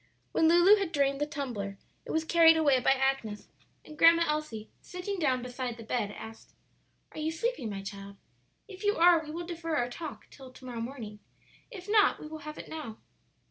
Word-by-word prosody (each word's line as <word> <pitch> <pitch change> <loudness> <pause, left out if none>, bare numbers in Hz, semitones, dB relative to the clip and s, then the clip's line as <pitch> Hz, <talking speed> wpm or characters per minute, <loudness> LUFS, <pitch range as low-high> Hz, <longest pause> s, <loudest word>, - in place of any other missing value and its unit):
When 320 - +3
Lulu 350 +5 +6
had 390 -5 -2
drained 280 -2 +1
the 295 - +1
tumbler 240 -10 -5 0.3
it - - -6
was 320 - 0
carried 325 -1 +6
away 285 -5 +4
by 260 - +4
Agnes, 265 -6 -1 0.4
and 305 - -11
Grandma 335 +2 +6
Elsie, 300 -9 -3
sitting 365 +2 -5
down 260 -6 +1
beside 250 -1 -5
the 230 - -9
bed, 220 -2 -2
asked, 225 0 -11 0.6
"Are - - -9
you 310 +1 -1
sleepy, 465 - -2
my 195 -2 -5
child? 200 0 -9 0.5
If 390 -1 -11
you 410 0 +2
are 340 -1 +5
we 300 - -10
will 340 +3 -5
defer 330 -2 -4
our 245 -3 0
talk 315 +3 -8
till 265 -2 -13
to 255 - -15
morrow 240 -2 -5
morning; 230 -4 -7 0.5
if 385 -6 -10
not, 420 0 +4
we - - -9
will 310 0 -8
have 305 0 -8
it - - -9
now." 295 -9 -7
300 Hz, 200 wpm, -29 LUFS, 245-335 Hz, 0.6 s, Lulu